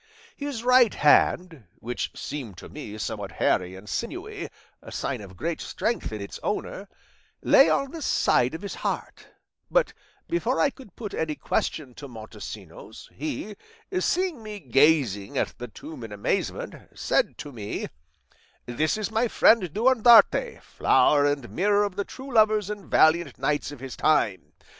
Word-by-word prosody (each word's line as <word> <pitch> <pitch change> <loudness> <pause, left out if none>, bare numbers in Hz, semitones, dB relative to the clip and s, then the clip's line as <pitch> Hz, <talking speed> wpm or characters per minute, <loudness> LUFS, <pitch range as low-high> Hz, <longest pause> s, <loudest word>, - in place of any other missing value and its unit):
His 280 -5 -5
right 250 -3 +5
hand 160 - +3
(which 120 +1 -4
seemed 130 -10 -6
to - - -10
me 110 -8 -8
somewhat 110 - -5
hairy 90 0 +1
and 95 +2 -12
sinewy, 90 - -5 0.3
a - - -11
sign - - -3
of 95 -2 -12
great 165 0 -3
strength 235 - -2
in 110 - -5
its 100 0 -7
owner) 205 -1 -4 0.5
lay - - +6
on 275 -1 +1
the 330 - -7
side 130 - +2
of 165 - -8
his 200 - -5
heart; - - -4 0.4
but - - +2 0.3
before 270 -7 0
I 285 - +3
could 255 -10 -15
put 210 -4 -7
any 155 -1 -2
question 140 -4 -2
to 140 +3 -9
Montesinos, 110 -3 -10
he, 170 +8 -5 0.4
seeing 360 -8 0
me 210 -1 -7
gazing 135 - +2
at - - 0
the 125 - -5
tomb 125 +4 -10
in 110 - -8
amazement, 105 0 -2 0.2
said - - +1
to 145 - -8
me, 105 -5 -5 0.8
'This 150 - 0
is 215 0 -3
my 225 +2 +2
friend 215 -6 +4
Durandarte, 240 - +5
flower 145 -1 +3
and 145 -4 -1
mirror 205 +3 +2
of 200 -3 -3
the 200 0 -2
true 265 0 -9
lovers 215 -2 +3
and 205 -2 -8
valiant 165 +2 +3
knights 145 0 -1
of 145 - -10
his 135 0 -7
time. 115 -11 +1
160 Hz, 155 wpm, -26 LUFS, -, 0.8 s, lay